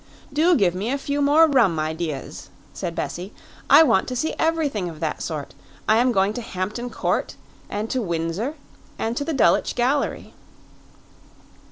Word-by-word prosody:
"Do 330 +4 +4
give 190 - +3
me 195 +5 -3
a 275 - 0
few 285 +1 -2
more 295 +3 +6
rum 245 - +3
ideas," 155 -2 -4 0.2
said 170 -1 -5
Bessie. 180 +4 -5 0.3
"I 320 - +9
want 190 -11 +2
to 255 - -4
see 315 +6 -1
everything 300 - 0
of 160 -2 -10
that 160 -2 -3
sort. 150 -4 -5 0.3
I 220 - +5
am 250 +2 +3
going 195 -1 +2
to 245 - -4
Hampton 215 +4 -4
Court, - - -2 0.3
and 210 +2 -3
to 260 - 0
Windsor, 170 - -2 0.4
and 225 +1 -2
to 285 - -1
the 325 - -3
Dulwich 265 - +3
Gallery." 265 +4 0
225 Hz, 165 wpm, -23 LUFS, 175-280 Hz, 0.4 s, I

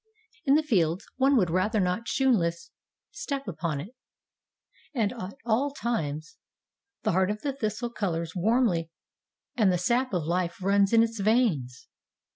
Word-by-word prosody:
In 275 - +6
the 310 - +3
fields 185 - +1
one 270 +1 +4
would 180 -7 +2
rather 210 +5 +1
not 185 +5 -1
shoon 265 -1 +3
less 170 -5 -1 0.4
step 280 - -4
upon 165 -5 -3
it. 165 +8 -7 1.1
At 225 -2 +1 0.3
all 240 +5 +2
times 165 - -3 0.7
the - - +2
heart 185 +1 +2
of 210 +1 -4
the 280 - -1
thistle 230 -1 -3
colors 170 -6 -3
warmly 185 -4 +2 0.7
and 210 -6 +4
the 180 - +1
sap 240 +8 +1
of 175 - 0
life 170 +2 -1
runs 195 +1 +3
in 230 -1 +6
its 230 -1 -3
veins. 195 - +1
205 Hz, 150 wpm, -27 LUFS, 170-240 Hz, 1.1 s, In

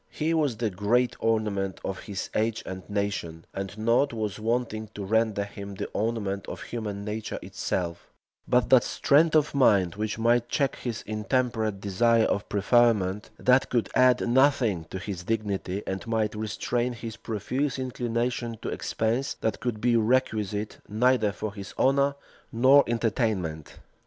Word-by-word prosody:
He 160 +2 -1
was 145 -8 +1
the 110 -2 -1
great 110 +6 +1
ornament 105 -4 0
of 95 - -3
his 100 -3 -6
age 110 0 0
and 95 0 -6
nation; 100 -5 -3
and 95 +1 -5
nought 115 +5 +2
was 110 -2 -3
wanting 110 -1 -1
to 100 - -5
render 110 0 +1
him 100 -1 -8
the - - -4
ornament 105 -3 -2
of - - -6
human 105 -4 -5
nature 105 0 -4
itself, 85 -2 -3 0.4
but 125 0 +2
that 130 -2 +7
strength 155 +3 +3
of 150 -1 +3
mind 100 -10 +4
which 105 +1 -3
might 120 +1 +2
check 140 -2 +1
his 115 -3 -4
intemperate 110 -1 -1
desire 115 +3 +3
of 100 - -1
preferment, 105 -2 +2
that 130 +1 +3
could 120 -5 0
add 130 -1 +4
nothing 120 - +3
to 95 - -7
his 95 -2 -5
dignity, 100 -2 -2
and 95 +4 -4
might 110 -2 0
restrain 115 +3 -2
his 115 -2 -7
profuse 125 +6 -2
inclination 120 -2 -2
to - - -2
expense, 115 +5 -1
that 110 - -1
could 120 -3 -3
be 120 +2 +2
requisite 110 -3 0
neither 110 0 +3
for 105 0 -5
his 100 -1 -9
honor 140 +1 +3 0.4
nor 130 +5 +6
entertainment. 105 - -1
110 Hz, 150 wpm, -27 LUFS, 100-120 Hz, 0.4 s, that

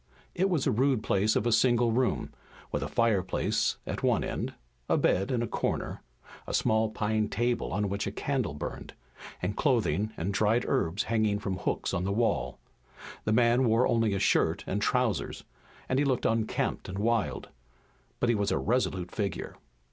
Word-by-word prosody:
It 190 +2 +1
was 165 -7 +1
a 135 - +3
rude 125 0 +2
place 105 +1 +2
of 105 - +1
a 120 - +2
single 120 0 +3
room, 125 +2 0 0.4
with 75 - -1
a 70 - -2
fire 110 +3 +2
place 90 - 0
at - - -4
one - - +2
end, - - -4 0.3
a - - +3
bed 95 +2 +2
in 120 -2 0
a - - -2
corner, - - -2 0.5
a - - -1
small 110 0 +2
pine 110 0 -1
table 120 +2 -1
on 105 +1 0
which 100 +1 -2
a - - -2
candle 125 - -2
burned, 75 - -6 0.5
and 100 +3 -1
clothing 110 - +1
and 95 +5 -2
dried 110 +4 +2
herbs 85 +6 0
hanging 110 -2 +1
from 100 -3 -3
hooks - - -2
on 90 - 0
the 95 - -1
wall. 100 - 0 0.7
The 110 - +2
man 120 +2 +4
wore 115 +2 +3
only 115 -3 +2
a - - -1
shirt - - +2
and - - -2
trousers, - - 0 0.4
and 130 - +1
he 145 - +2
looked 130 -3 0
unkempt 115 -1 -1
and 95 - -5
wild, 115 +1 0 0.7
but - - +1
he 120 - +4
was 100 -2 0
a - - +2
resolute 95 -6 0
figure. 100 -3 -3
110 Hz, 185 wpm, -29 LUFS, 100-120 Hz, 0.7 s, man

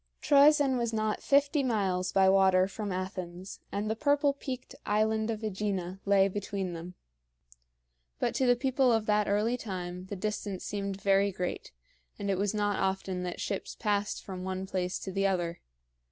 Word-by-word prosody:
Troezen 285 -2 +5
was 235 -1 0
not 215 -1 -1
fifty 285 +1 +3
miles 195 -7 0
by 190 -1 +4
water 190 -1 +5
from 205 0 -5
Athens, 185 0 -5
and 205 +1 -2
the 220 - 0
purple 285 +2 +2
peaked 265 -2 -6
island 220 +1 +1
of 220 -1 -3
AEgina 195 -3 -3
lay 195 -1 +5
between 195 -2 -3
them; 170 +2 -8 1.2
but - - 0
to 260 +1 +1
the 245 - +6
people 260 0 +2
of 225 -2 +2
that 210 -1 +2
early 215 +4 +1
time 185 -4 -6
the 200 - -5
distance 205 -1 -3
seemed 200 -1 -3
very 200 0 +3
great, 180 -1 -4 0.5
and 200 -1 -2
it 190 - 0
was 200 0 +1
not 205 -1 0
often 190 -1 -1
that 180 -1 -4
ships 200 - -3
passed 205 -1 -1
from 185 -2 -6
one 190 0 -3
place 185 -1 -2
to 190 - -6
the 195 +1 +1
other. 175 -3 -1
200 Hz, 170 wpm, -30 LUFS, 190-220 Hz, 1.2 s, the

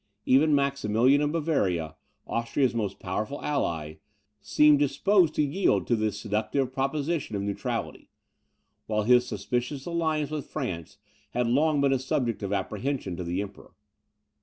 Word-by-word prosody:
Even 145 +3 +4
Maximilian 140 -1 +2
of 150 0 +1
Bavaria, 100 - 0 0.3
Austria's 120 +3 0
most 105 -4 -2
powerful 110 +9 -3
ally, 80 - -2 0.4
seemed 150 +6 +5
disposed 155 +5 +3
to 150 - +2
yield 155 +7 +1
to 120 - +2
the 110 -1 0
seductive 110 +6 -2
proposition 140 -1 -1
of 100 - -2
neutrality; 100 0 -4 0.8
while 110 -1 0
his 125 +2 +4
suspicious 125 +3 -3
alliance 160 -3 -1
with 150 -2 -5
France 95 - -5 0.4
had 125 - +1
long 145 +5 +2
been 140 -1 +3
a 135 - +1
subject 125 -3 -1
of 100 -1 -3
apprehension 105 -1 -2
to 90 - -5
the 90 +3 -2
Emperor. 100 -1 -12
130 Hz, 140 wpm, -27 LUFS, 105-145 Hz, 0.8 s, seemed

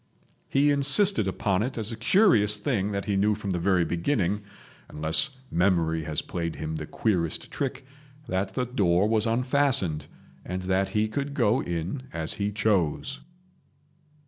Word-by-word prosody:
He 145 +2 +3
insisted 145 - +3
upon 95 0 0
it 125 +3 -3
as 110 0 -3
a - - -4
curious 115 - +3
thing 105 -2 -1
that 100 -1 -3
he 100 - 0
knew 105 +2 +2
from 100 -2 -4
the 90 - -1
very 90 -1 +2
beginning—unless 100 - -2
memory 85 -3 +1
has 75 0 -2
played 85 -2 -4
him 80 +1 -4
the 75 -1 -6
queerest 90 -8 -1
trick—that 135 -7 -5
the 125 - 0
door 100 -6 +2
was 110 0 +2
unfastened, 115 - +2 0.4
and 90 0 -4
that 95 +1 +1
he 105 0 +1
could 140 +5 -4
go 120 -1 +2
in 85 - -4
as 80 -1 -4
he 100 0 -2
chose. 105 - 0
105 Hz, 145 wpm, -26 LUFS, 90-130 Hz, 0.4 s, He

